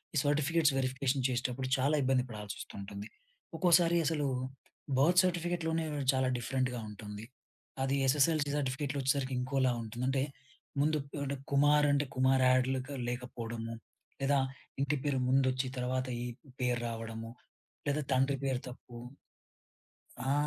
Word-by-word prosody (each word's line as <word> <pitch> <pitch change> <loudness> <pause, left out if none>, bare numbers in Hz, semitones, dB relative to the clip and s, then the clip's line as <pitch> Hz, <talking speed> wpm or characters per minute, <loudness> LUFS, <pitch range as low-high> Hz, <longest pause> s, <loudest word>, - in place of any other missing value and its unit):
ఈ - - +2
certificates 150 +1 +3
verification 130 0 0
చేసేటప్పుడు 125 +1 -1
చాలా 140 +4 +2
ఇబ్బంది 130 -1 +2
పడాల్సొస్తూంటుంది. 100 -1 -7 0.5
ఒక్కోసారి 170 0 +5
అసలు 150 -2 +1 0.7
బర్త్ 175 +6 +6
సర్టిఫికేట్‌లోనే 170 -2 0 0.3
చాలా 130 0 +2
డిఫరెంట్‌గా 125 -1 -1
ఉంటుంది. 105 +1 -8 0.6
అది 135 +1 +1
ఎస్ఎస్ఎల్ 150 +4 +4 0.2
సర్టిఫికేట్‌లో 140 +1 -1
వచ్చేసరికి 135 0 +1
ఇంకోలా 130 0 +1
ఉంటుంది. 115 +3 -5
అంటే 135 0 +1 0.6
ముందు 155 +1 +3 0.3
అంటే 140 0 -2 0.2
కుమార్ 145 +1 +5
అంటే 145 0 +2
కుమార్ 130 0 +4
యాడ్‌లకు 130 +2 +1
లేకపోవడము 120 -2 -4 0.5
లేదా 140 +1 +3 0.4
ఇంటి 140 +2 +1
పేరు 140 -3 +1
ముందొచ్చి, 130 0 +2
తర్వాత 130 +1 0 0.2
ఈ - - -3 0.3
పేరు 125 -1 +1
రావడము 115 0 -5 0.6
లేదా 145 +2 +1
తండ్రి 135 +2 +3
పేరు 130 -2 0
తప్పు. 125 -1 -11 1.3
ఆ! - - +4
130 Hz, 120 wpm, -32 LUFS, 125-145 Hz, 1.3 s, బర్త్